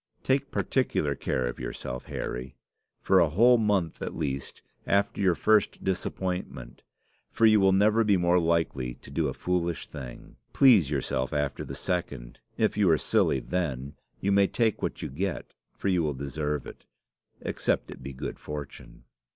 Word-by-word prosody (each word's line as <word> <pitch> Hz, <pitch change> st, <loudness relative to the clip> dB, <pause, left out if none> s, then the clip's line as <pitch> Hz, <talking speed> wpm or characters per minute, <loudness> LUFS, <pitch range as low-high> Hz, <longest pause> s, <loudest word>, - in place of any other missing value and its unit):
Take 135 Hz, +1 st, +1 dB
particular 80 Hz, -, 0 dB
care 65 Hz, -2 st, -2 dB
of -, -, -4 dB
yourself, 60 Hz, 0 st, -5 dB
Harry, 65 Hz, +2 st, -5 dB, 0.5 s
for 95 Hz, -1 st, +5 dB
a 85 Hz, -, +4 dB
whole 120 Hz, +9 st, +5 dB
month, 100 Hz, -7 st, 0 dB
at -, -, -4 dB
least, 70 Hz, -4 st, -4 dB, 0.2 s
after 100 Hz, 0 st, +1 dB
your 95 Hz, -3 st, +3 dB
first 110 Hz, +2 st, +2 dB
disappointment; 90 Hz, -9 st, -3 dB, 0.5 s
for 115 Hz, -, +2 dB
you 110 Hz, -1 st, +6 dB
will 95 Hz, -1 st, +5 dB
never 105 Hz, +4 st, +4 dB
be 105 Hz, -3 st, +3 dB
more 90 Hz, 0 st, +3 dB
likely 80 Hz, -7 st, 0 dB
to -, -, -15 dB
do -, -, 0 dB
a -, -, -3 dB
foolish 85 Hz, -3 st, -1 dB
thing. 65 Hz, -4 st, -10 dB, 0.2 s
Please 110 Hz, -, +6 dB
yourself 65 Hz, -1 st, -1 dB
after 75 Hz, -2 st, -1 dB
the -, -, -7 dB
second. 70 Hz, -10 st, -3 dB, 0.2 s
If 110 Hz, -1 st, +1 dB
you 100 Hz, -4 st, +4 dB
are 80 Hz, -, +5 dB
silly 65 Hz, -, +1 dB
then, 70 Hz, -6 st, -3 dB, 0.3 s
you 100 Hz, -, 0 dB
may 100 Hz, 0 st, +5 dB
take 115 Hz, 0 st, 0 dB
what -, -, -3 dB
you -, -, -2 dB
get, 90 Hz, +5 st, -4 dB, 0.2 s
for -, -, -3 dB
you 90 Hz, -3 st, +3 dB
will 75 Hz, -3 st, -1 dB
deserve 75 Hz, +2 st, -3 dB
it -, -, -12 dB, 0.5 s
except -, -, -1 dB
it -, -, -10 dB
be 70 Hz, +2 st, -6 dB
good 70 Hz, +2 st, -6 dB
fortune." 75 Hz, -4 st, -8 dB
85 Hz, 165 wpm, -27 LUFS, 70-100 Hz, 0.5 s, you